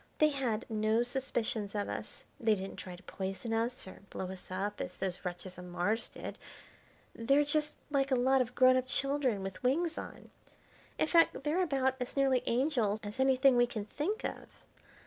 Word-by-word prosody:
They 305 - +5
had 255 -7 -1
no 220 +1 +2
suspicions 240 -5 -2
of 205 -1 -1
us; - - -6
they 220 -2 +3
didn't 190 0 -6
try 180 -1 -7
to 180 - -16
poison 195 +5 -4
us 230 +1 -1
or 190 - -10
blow 185 0 -4
us 190 -1 -9
up 195 +3 -3
as 180 - -5
those 185 -1 -3
wretches 180 +1 -5
on 180 0 -8
Mars 205 +6 0
did. - - -8 0.7
They're 275 +6 +3
just 300 +1 0 0.2
like 275 -1 +2
a 265 - +3
lot 260 +2 +4
of 250 0 -3
grown 255 0 +6
up 255 0 -1
children 270 -7 0
with 195 0 -6
wings 320 +6 +1
on. - - -9 0.7
In - - +3
fact 330 -3 +4
they're 310 +5 +1
about 265 -6 +1
as 250 +2 -4
nearly 265 -2 +4
angels 235 -5 +1
as 210 +4 -7
anything 265 0 +5
we 245 0 +5
can 220 -4 -4
think 320 - -2
of. - - -4
245 Hz, 185 wpm, -32 LUFS, 205-275 Hz, 0.7 s, grown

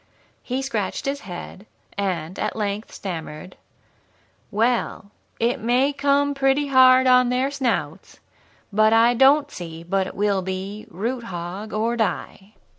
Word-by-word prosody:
He 260 +2 -3
scratched 215 -8 -3
his 280 +1 -2
head, 185 +1 -9 0.3
and 185 -3 -3
at 215 - -2
length 210 0 -3
stammered: 165 -2 -7 0.9
"'Well, 225 -1 -1 0.3
it 235 +2 +1
may 250 +5 +2
come 285 0 +2
pretty 275 +1 +1
hard 260 -1 +6
on 250 -1 +5
their 255 +2 0
snouts, 265 -4 -3 0.5
but 215 +1 +4
I 230 +2 +5
don't 280 +4 +4
see 165 -2 -8
but 190 +2 0
it - - -9
will 200 -1 +1
be 190 +3 -5
"Root, 235 +7 -4
hog, 185 +3 -6
or, 225 +3 0
die!"'" 215 -2 -3
225 Hz, 135 wpm, -23 LUFS, 195-260 Hz, 0.9 s, hard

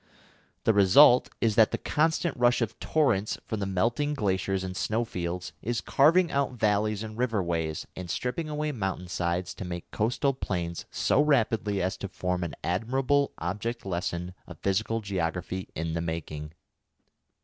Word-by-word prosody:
The 110 - +4
result 115 +7 +7
is 115 -2 +3
that 110 0 +5
the - - -2
constant 160 +1 +1
rush 120 0 +3
of 115 -4 -2
torrents 110 -10 +1
from 110 - -3
the 100 - -2
melting 120 +10 0
glaciers 95 -4 0
and 95 -1 -5
snowfields 90 -6 -2
is 120 +1 -1
carving 165 +5 +4
out 140 -2 0
valleys 105 -2 +1
and 110 -1 -7
river 115 -4 0
ways, 80 -3 -2
and 90 -1 -7
stripping 125 - -2
away 150 0 -1
mountain 95 -7 -3
sides 90 +1 -1
to - - -7
make 85 -1 -6
coastal 125 +6 +1
plains 85 -8 -3
so 145 - +2
rapidly 110 -9 +2
as 95 - -1
to 100 - -5
form 90 -1 -2
an 85 - -4
admirable 130 +9 +1
object 105 +7 -3
lesson 90 -1 -3
of 90 - -10
physical 110 +4 0
geography 95 -1 -3
in 80 0 -2
the 85 - -1
making. 80 -2 -5
100 Hz, 160 wpm, -28 LUFS, 90-120 Hz, -, result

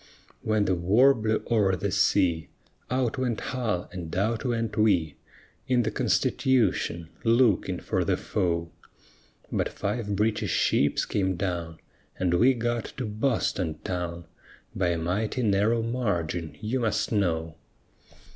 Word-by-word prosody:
When 110 -1 +1
the 95 - +2
war 105 +11 +5
blew 110 -3 -1
o'er 100 -5 +3
the 100 +2 -2
sea 95 -5 +2 0.4
Out 130 0 0
went 125 -4 -1
Hull 115 -9 -2
and 90 -4 -6
out 110 +4 0
went 115 -4 -1
we 90 -9 +2 0.5
In 125 -2 +3
the 110 - -1
Constitution, 100 -10 +1
looking 115 -3 +3
for - - -1
the - - +1
foe; 85 -2 -1 0.8
But - - 0
five 105 0 -3
British 105 +1 0
ships 70 - +2
came 95 -2 0
down 85 -3 -3 0.4
And 90 -2 +1
we 125 +9 +4
got 120 -1 -1
to 130 - -2
Boston 105 - -1
town 85 -2 -4 0.5
By 95 - +1
a 85 -1 +1
mighty 105 +9 -1
narrow 110 +2 +2
margin, 85 - -2
you 115 +5 -1
must 110 -3 0
know! 85 -6 0
105 Hz, 135 wpm, -27 LUFS, 90-115 Hz, 0.8 s, war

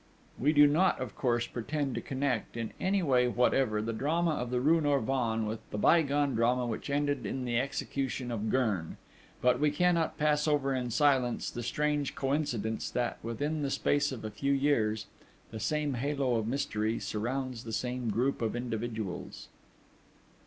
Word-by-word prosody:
We 145 +4 +3
do 145 -1 +7
not, 165 +6 +3
of 125 -5 -5
course, 120 -3 +1
pretend 140 +3 -3
to - - -3
connect, 130 -4 -2
in 115 -2 -3
any 195 0 +1
way 125 -5 +3
whatever, 120 -3 +2
the 115 +1 -2
drama 160 +8 +1
of 125 -5 -2
the 125 0 0
rue 160 +5 +4
Norvins 125 -6 +1
with 110 +1 -3
the - - -4
bygone 145 +1 +3
drama 120 +2 +2
which 115 +3 -4
ended 145 -1 0
in 130 -1 -3
the 120 -1 +1
execution 135 -2 -3
of 110 -1 -2
Gurn, 105 -10 0 0.5
but 125 0 +4
we 150 0 +3
cannot 165 0 +1
pass 150 0 +2
over 140 -2 +2
in 125 -2 -2
silence 130 -1 +2
the 120 - -5
strange 150 +3 -1
coincidence 135 -6 -1
that, 120 -1 -2
within 145 +7 -2
the 140 - -1
space 145 +1 +1
of 115 -4 -6
a 110 - -4
few 140 +7 0
years, 110 -7 +1 0.5
the 110 - -6
same 150 +5 0
halo 135 0 0
of 110 -1 -2
mystery 115 -4 -1
surrounds 125 +2 -3
the 115 - -7
same 125 +1 -2
group 120 +7 0
of 115 0 -1
individuals.... 110 -5 -4
130 Hz, 170 wpm, -30 LUFS, 115-145 Hz, 0.5 s, do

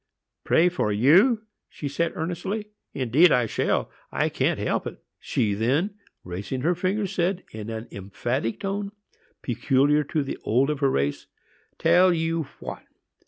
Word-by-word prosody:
"Pray 170 - +4
for 175 -12 0
you!" 180 - +5 0.3
she 145 - -6
said, 165 +4 -1
earnestly. 190 +6 -3 0.2
"Indeed 140 +6 +4
I 125 - +3
shall,—I - - -1
can't - - 0
help - - -1
it." - - -7 0.2
She 105 -3 0
then, 135 - +1 0.3
raising 95 +8 -5
her 170 +6 +2
finger, 190 +4 -1
said, 185 0 -1
in 110 0 -7
an 110 +1 -5
emphatic 115 +4 -3
tone, 200 +1 -3 0.5
peculiar 135 +4 +2
to 150 +1 -1
the 135 - -5
old 130 +6 +2
of 150 - -3
her 140 -2 +3
race, 70 - -1 0.5
"Tell 185 +1 +5
you 165 -1 0
what! - - -7
150 Hz, 145 wpm, -25 LUFS, 115-180 Hz, 0.5 s, you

